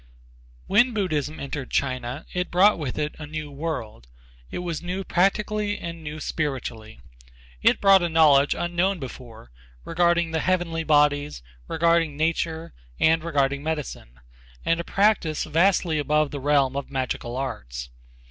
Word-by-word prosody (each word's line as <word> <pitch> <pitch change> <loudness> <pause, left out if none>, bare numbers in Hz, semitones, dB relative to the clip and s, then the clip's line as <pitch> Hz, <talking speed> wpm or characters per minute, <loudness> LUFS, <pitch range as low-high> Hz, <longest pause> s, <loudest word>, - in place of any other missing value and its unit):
When 240 +4 +3
Buddhism 155 -7 -1
entered 140 -1 -5
China 130 +1 -2
it 180 0 -2
brought 190 +2 +4
with 140 -5 -4
it 150 0 -2
a 150 - -7
new 155 -1 -6
world. 140 - -5 0.4
It - - -5
was 170 -3 -3
new 180 +2 -4
practical 200 +4 +1
and 170 -6 -4
new 150 0 -6
spiritually. 130 - -4 0.6
It - - +4
brought 195 -1 +6
a 175 - 0
knowledge 150 -3 +5
unknown 175 +3 0
before 120 - -10 0.3
regarding 170 0 +2
the 160 - 0
heavenly 175 -2 0
bodies, 145 - +2 0.2
regarding 165 -2 +2
nature 160 +1 -1 0.3
and 160 0 +3
regarding 140 -4 0
medicine, 150 - -5 0.5
and 165 0 +2
a - - -2
practice 195 -6 +1
vastly 170 0 +2
above 150 0 +1
the 145 - -4
realm 140 -1 +2
of 140 -1 -4
magical 130 -2 -3
arts. 60 - -5
155 Hz, 140 wpm, -24 LUFS, 140-170 Hz, 0.6 s, brought